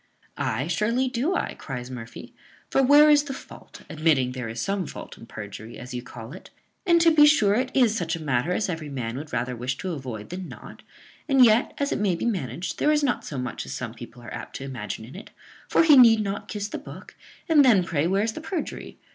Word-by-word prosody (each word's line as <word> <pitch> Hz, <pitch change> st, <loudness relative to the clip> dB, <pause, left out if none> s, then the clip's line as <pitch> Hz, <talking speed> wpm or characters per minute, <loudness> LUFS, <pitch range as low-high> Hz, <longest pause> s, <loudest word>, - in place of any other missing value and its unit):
"Ay, 115 Hz, +5 st, -1 dB
surely 220 Hz, +10 st, 0 dB
do 265 Hz, +9 st, -1 dB
I," -, -, -2 dB
cries 125 Hz, -2 st, -7 dB
Murphy; 115 Hz, -2 st, -9 dB, 0.4 s
"for 270 Hz, -, +3 dB
where 290 Hz, +3 st, +7 dB
is 295 Hz, -1 st, +5 dB
the 270 Hz, -2 st, -5 dB
fault, -, -, -13 dB
admitting 150 Hz, -5 st, +1 dB
there 125 Hz, -3 st, -5 dB
is 115 Hz, +1 st, -6 dB
some 195 Hz, +2 st, -2 dB
fault -, -, -9 dB
in 115 Hz, -, -14 dB
perjury, 110 Hz, +2 st, -9 dB
as 125 Hz, +1 st, -9 dB
you 125 Hz, -, -3 dB
call 120 Hz, 0 st, -10 dB
it? 185 Hz, -, -12 dB, 0.4 s
and, 340 Hz, -1 st, +5 dB
to 335 Hz, 0 st, +6 dB
be 300 Hz, -1 st, +7 dB
sure, 215 Hz, -10 st, +4 dB
it 250 Hz, +4 st, 0 dB
is 240 Hz, -5 st, +4 dB
such 170 Hz, -6 st, -1 dB
a -, -, -7 dB
matter 145 Hz, +1 st, 0 dB
as 205 Hz, -, 0 dB
every 160 Hz, -4 st, -4 dB
man 120 Hz, -4 st, -4 dB
would 150 Hz, +3 st, -7 dB
rather 125 Hz, +1 st, -2 dB
wish 125 Hz, +2 st, -3 dB
to 185 Hz, -, -4 dB
avoid 125 Hz, -9 st, -6 dB
than 180 Hz, 0 st, -6 dB
not: -, -, -11 dB, 0.5 s
and 270 Hz, -2 st, +7 dB
yet, 225 Hz, +2 st, +3 dB
as 280 Hz, 0 st, -1 dB
it -, -, -1 dB
may 200 Hz, -4 st, +1 dB
be 170 Hz, -, -4 dB
managed, 180 Hz, -, -3 dB
there 300 Hz, -, +3 dB
is 300 Hz, -1 st, +2 dB
not 260 Hz, -3 st, 0 dB
so 145 Hz, -, -6 dB
much 125 Hz, -1 st, -4 dB
as -, -, -7 dB
some 115 Hz, -3 st, -5 dB
people 120 Hz, 0 st, -12 dB
are 120 Hz, -, -9 dB
apt -, -, -8 dB
to -, -, -6 dB
imagine 110 Hz, -5 st, -6 dB
in 125 Hz, -, -13 dB
it; 195 Hz, -, -10 dB, 0.4 s
for -, -, +4 dB
he 310 Hz, -3 st, +7 dB
need 230 Hz, -4 st, +7 dB
not 200 Hz, 0 st, -4 dB
kiss 205 Hz, -1 st, -4 dB
the -, -, -6 dB
book, -, -, -11 dB, 0.3 s
and 310 Hz, -4 st, +6 dB
then 220 Hz, -8 st, +5 dB
pray 165 Hz, -3 st, 0 dB
where's 200 Hz, +4 st, +1 dB
the 315 Hz, -, -7 dB
perjury? 330 Hz, +1 st, -5 dB
175 Hz, 235 wpm, -25 LUFS, -, 0.5 s, where